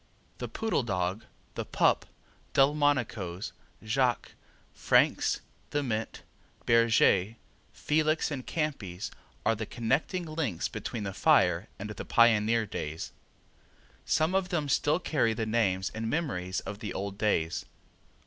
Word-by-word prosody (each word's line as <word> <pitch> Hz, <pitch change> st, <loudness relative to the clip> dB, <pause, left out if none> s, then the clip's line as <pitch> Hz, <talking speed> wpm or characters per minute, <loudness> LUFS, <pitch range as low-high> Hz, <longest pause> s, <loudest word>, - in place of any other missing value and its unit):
The -, -, -3 dB
Poodle 225 Hz, -8 st, -1 dB
Dog, 95 Hz, -2 st, -2 dB, 0.3 s
the -, -, -3 dB
Pup, -, -, +2 dB, 0.5 s
Delmonico's, 130 Hz, -, +1 dB, 0.3 s
Jacques, 125 Hz, +2 st, +1 dB, 0.4 s
Frank's, -, -, +2 dB, 0.3 s
the 145 Hz, 0 st, 0 dB
Mint, 110 Hz, -4 st, -3 dB, 0.4 s
Bergez, 115 Hz, -3 st, +4 dB, 0.4 s
Felix 155 Hz, +1 st, +1 dB
and 135 Hz, -3 st, -3 dB
Campi's 110 Hz, -, -3 dB, 0.3 s
are 110 Hz, -, +4 dB
the 110 Hz, -1 st, -4 dB
connecting 135 Hz, +10 st, -1 dB
links 155 Hz, -, -2 dB
between 115 Hz, -3 st, -5 dB
the 100 Hz, -1 st, -4 dB
fire 95 Hz, -, +3 dB
and 105 Hz, +1 st, -6 dB
the 105 Hz, -, -6 dB
pioneer 115 Hz, -1 st, +4 dB
days. 80 Hz, -5 st, -5 dB, 0.9 s
Some 160 Hz, +3 st, +1 dB
of 190 Hz, -1 st, +1 dB
them 155 Hz, -5 st, -1 dB
still 145 Hz, +2 st, +3 dB
carry 125 Hz, -10 st, +1 dB
the 110 Hz, -, -1 dB
names 100 Hz, -4 st, +1 dB
and 110 Hz, 0 st, -3 dB
memories 95 Hz, -, -2 dB
of 100 Hz, +1 st, -7 dB
the 105 Hz, -3 st, -5 dB
old 100 Hz, +1 st, -4 dB
days. 85 Hz, -7 st, 0 dB
115 Hz, 125 wpm, -29 LUFS, 100-145 Hz, 0.9 s, Bergez